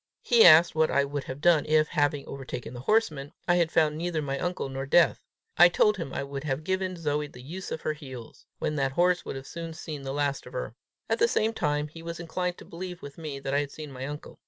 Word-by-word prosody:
He 235 -2 +6
asked 165 +1 +8
what 160 0 +3
I 140 - +2
would 140 -1 -4
have 130 +2 -7
done, 165 -2 +5
if, 155 0 +3
having 145 -1 +1
overtaken 130 -3 -7
the 120 - -7
horseman, 155 - 0
I 175 0 +4
had 170 -2 +2
found 155 -2 +3
neither 170 -1 -1
my 140 -2 -2
uncle 180 -4 -2
nor 135 0 -5
Death. 170 +4 +4 0.4
I 175 0 +9
told 210 +3 +3
him 165 -7 -5
I - - -3
would 140 0 -6
have 145 0 -2
given 185 +1 -1
Zoe 150 -2 -1
the 125 -3 -13
use 180 +7 -7
of 160 - -4
her 155 - -1
heels, 130 -6 -11
when 150 - -2
that 135 -1 0
horse 175 +3 +2
would 135 0 -6
soon 170 +3 -6
have 165 - -9
seen 155 -3 -6
the 135 0 -5
last 140 0 -1
of - - -12
her. - - -4 0.3
At - - 0
the 460 - +5
same 225 - +1
time, 150 -6 0
he 165 +2 -12
was 170 0 -6
inclined 180 +1 -3
to - - -12
believe 180 +1 -7
with 140 +2 -9
me, 150 -4 -5
that 135 0 -3
I 140 - +3
had 145 -1 -2
seen 155 -2 -8
my 130 0 -6
uncle. 150 +1 -8
155 Hz, 255 wpm, -27 LUFS, 140-175 Hz, 0.4 s, I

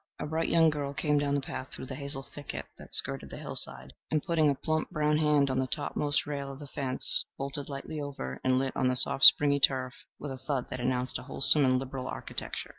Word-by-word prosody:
A - - -5
bright 160 +2 -1
young 165 -1 +4
girl 140 -2 -4
came 150 -1 +1
down 145 0 0
the 140 - 0
path 130 -1 -6
through - - -7
the 130 - -7
hazel 140 0 -4
thicket 145 +1 -8
that - - -13
skirted - - +1
the - - -9
hillside, 65 +1 0 0.2
and 155 -2 0
putting 160 -3 +2
a 140 - +1
plump 155 +3 -2
brown 150 0 +1
hand 150 -3 +2
on 130 - 0
the 130 - -1
topmost 145 +2 -1
rail 140 -2 -5
of 135 - -10
the 145 - -10
fence 140 - -1
vaulted 140 +1 -5
lightly 145 +2 -6
over, 135 - -6
and 130 0 +2
lit 135 0 -2
on 130 - +1
the 125 - +1
soft 135 +1 +6
springy 140 -1 +7
turf 130 -2 +2 0.2
with 145 - -7
a 130 - -7
thud 130 -1 -3
that 130 - -5
announced 125 +1 -2
a - - -10
wholesome 145 +1 +5
and 130 0 +3
liberal 130 0 -5
architecture. - - -6
140 Hz, 230 wpm, -29 LUFS, 130-150 Hz, 0.2 s, springy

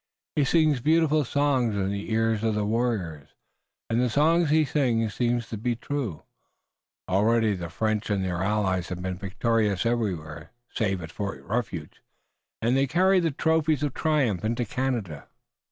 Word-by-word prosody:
He 145 - +3
sings 155 -2 +3
beautiful 155 +1 +3
songs 130 -4 +1
in 95 -1 -1
the 100 +2 -4
ears 110 -1 +1
of 110 -1 +1
the 105 -1 0
warriors, 105 -10 -1 0.6
and 115 +2 +1
the 125 - +2
songs 160 +5 +3
he 155 +1 +4
sings 120 -6 0
seem 120 -1 +1
to 115 -1 -7
be 120 +2 -1
true. 120 - -4 0.8
Already 110 +3 +2
the 85 -3 -5
French 110 +5 -1
and 100 -2 0
their 90 -1 -2
allies 95 -3 0
have 90 -1 -5
been 90 -1 -3
victorious 105 0 0
everywhere 85 -10 -2 0.2
save 95 -5 -1
at 80 - -8
Fort 100 -2 -5
Refuge, 100 -8 -4 0.6
and 120 +3 +2
they 135 +1 +2
carry 185 +6 +3
the 170 -2 +1
trophies 155 0 +1
of 145 -3 -1
triumph 140 - +1
into 115 +2 -1
Canada." 115 - -3
115 Hz, 160 wpm, -26 LUFS, 95-135 Hz, 0.8 s, he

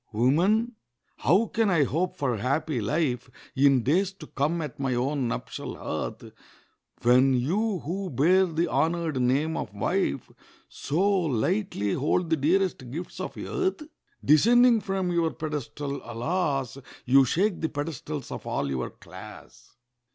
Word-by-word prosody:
Woman, 190 - +2 0.4
how 185 +10 +3
can 225 -1 0
I 165 -5 +4
hope 170 +6 -1
for 125 -5 0
happy 135 +3 -1
life 125 0 -1 0.3
In 135 -2 +4
days 180 - +2
to 175 -5 -11
come 150 +4 -1
at 145 -3 -7
my 135 -2 0
own 130 +1 0
nuptial 115 - -5
hearth, - - -5 0.7
When 130 +2 +5
you 185 - 0
who 190 +4 -4
bear 180 +8 +3
the 165 +1 0
honoured 160 -1 0
name 140 +6 +1
of 105 - -5
wife 85 -7 -1 0.4
So 170 +8 -1
lightly 170 - 0
hold 165 +4 0
the - - +5
dearest 160 -3 0
gifts 165 +8 -7
of - - -5
earth? 375 -4 -2 0.4
Descending 235 - +5
from 190 -2 -2
your 170 -1 +2
pedestal, 145 -2 -5
alas! 135 +2 -2 0.3
You 135 +2 +6
shake 180 - 0
the 160 - 0
pedestals 145 -1 -5
of - - -7
all 70 - -1
your 65 -2 -2
class. - - -13
155 Hz, 140 wpm, -26 LUFS, 130-185 Hz, 0.7 s, You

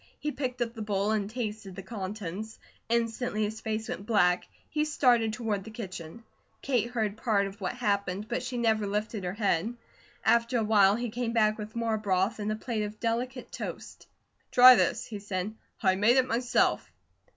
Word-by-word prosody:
He 300 - -2
picked 255 -3 -2
up 230 -1 -6
the 225 - -7
bowl 205 0 0
and 210 -2 0
tasted 215 -4 -5
the 195 - -7
contents. 205 0 -6 0.3
Instantly 230 -1 0
his 215 +1 -3
face 220 0 -3
went 200 - -6
black; 180 -6 +3 0.2
he 300 -1 0
started 245 -7 +3
toward 215 -3 -2
the 220 - -9
kitchen. 190 -3 -8 0.4
Kate 240 -4 +1
heard 220 -4 -1
part 215 -4 +1
of 195 +1 -8
what 185 - -2
happened, 200 -3 -1
but 240 - -2
she 250 0 -4
never 220 -3 +2
lifted 210 0 -2
her 180 0 -2
head. 210 +1 0 0.5
After 235 +1 +3
a 225 - +1
while 205 -2 +5
he 240 0 -3
came 235 0 -2
back 215 -1 +3
with 210 +1 -7
more 225 -2 0
broth 200 +2 0
and 210 0 -1
a - - 0
plate 220 0 -3
of 210 0 -5
delicate 245 +2 -2
toast. - - -7 0.4
"Try 255 +1 +10
this," 245 0 +1
he 210 -3 -6
said. 200 0 -3 0.3
"I 190 -2 +5
made 220 +6 +4
it 260 - +5
myself." 245 +1 +1
220 Hz, 185 wpm, -29 LUFS, 205-235 Hz, 0.5 s, Try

